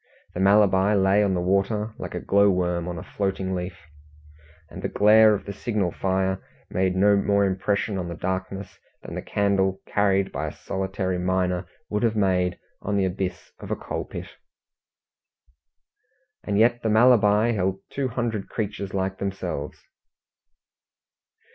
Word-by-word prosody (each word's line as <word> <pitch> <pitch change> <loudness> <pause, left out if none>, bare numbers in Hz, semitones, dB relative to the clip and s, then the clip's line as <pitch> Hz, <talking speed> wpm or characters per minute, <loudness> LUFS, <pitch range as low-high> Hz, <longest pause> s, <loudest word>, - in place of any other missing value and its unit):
The - - -5
Malabar 100 0 +4
lay 95 +1 +4
on 95 -2 +1
the 90 - 0
water 100 +4 0
like - - -6
a - - -2
glow 100 +1 +3
worm 90 -2 0
on 90 -1 -4
a - - -6
floating 95 -1 -2
leaf, 90 0 -4 0.9
and - - -9
the - - -2
glare 110 +1 +6
of - - -7
the 100 - -5
signal 105 -4 -1
fire 95 +1 -1 0.3
made 95 0 +1
no 100 +2 +4
more 100 0 +2
impression 95 +1 -1
on 90 - -4
the 85 - -5
darkness 95 +2 -4 0.2
than - - -8
the - - -4
candle 95 -2 0
carried 100 -1 +1
by 75 +3 -3
a - - -4
solitary 95 -1 -3
miner 90 0 0 0.2
would 105 0 -2
have 115 -2 +1
made 90 -3 +1 0.2
on 105 0 -1
the 95 - +2
abyss 95 -1 -4
of - - -9
a - - 0
coal - - -5
pit. - - -8 2.1
And 100 - -1
yet 120 +2 +3
the 110 - 0
Malabar 110 -1 +5
held 95 -2 -1
two 135 -1 -1
hundred 115 -4 -3
creatures 100 -2 -4
like 95 0 -2
themselves! 95 -7 -4
95 Hz, 155 wpm, -24 LUFS, 95-105 Hz, 2.1 s, glare